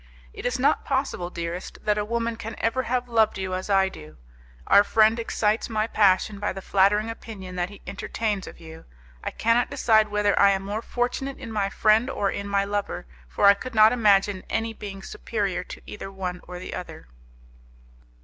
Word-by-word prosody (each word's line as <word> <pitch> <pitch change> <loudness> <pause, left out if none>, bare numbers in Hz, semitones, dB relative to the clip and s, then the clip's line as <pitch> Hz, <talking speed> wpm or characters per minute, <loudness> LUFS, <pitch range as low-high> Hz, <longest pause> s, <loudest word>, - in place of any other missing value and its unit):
It - - -4
is 245 - -1
not 260 +2 +2
possible, 265 -10 -1
dearest, 170 +1 -5
that 210 0 +1
a - - 0
woman 230 +1 -2
can 225 0 -7
ever 230 +3 0
have 250 0 0
loved 225 -2 +2
you 190 -1 -3
as 185 +2 -4
I 195 -1 +4
do. 75 - -11 0.5
Our 200 - +6
friend 220 +2 +3
excites 220 -1 0
my 215 -1 0
passion 205 -2 +2
by 205 - -1
the 195 - -7
flattering 205 +3 +3
opinion 205 -5 -8
that 175 0 -1
he 205 - -14
entertains 205 0 -3
of - - -11
you. 160 -1 -12 0.4
I - - -2
cannot 230 +2 +1
decide 220 -2 +3
whether 210 0 +1
I 200 0 +6
am 195 0 -2
more 210 +2 -3
fortunate 245 +3 -2
in 245 -4 -8
my 205 -2 0
friend 220 +5 +3
or 200 -6 -1
in 200 - -4
my 200 0 +1
lover, 205 - -3 0.2
for - - 0
I 200 - +9
could 240 +4 -8
not 215 0 +7
imagine 205 -4 +3
any 225 0 -1
being 195 -3 -8
superior 200 -5 -3
to - - -10
either 195 -1 -8
one 185 -2 -5
or 180 0 -7
the 180 - -7
other." 180 - -8
210 Hz, 195 wpm, -25 LUFS, 195-225 Hz, 0.5 s, I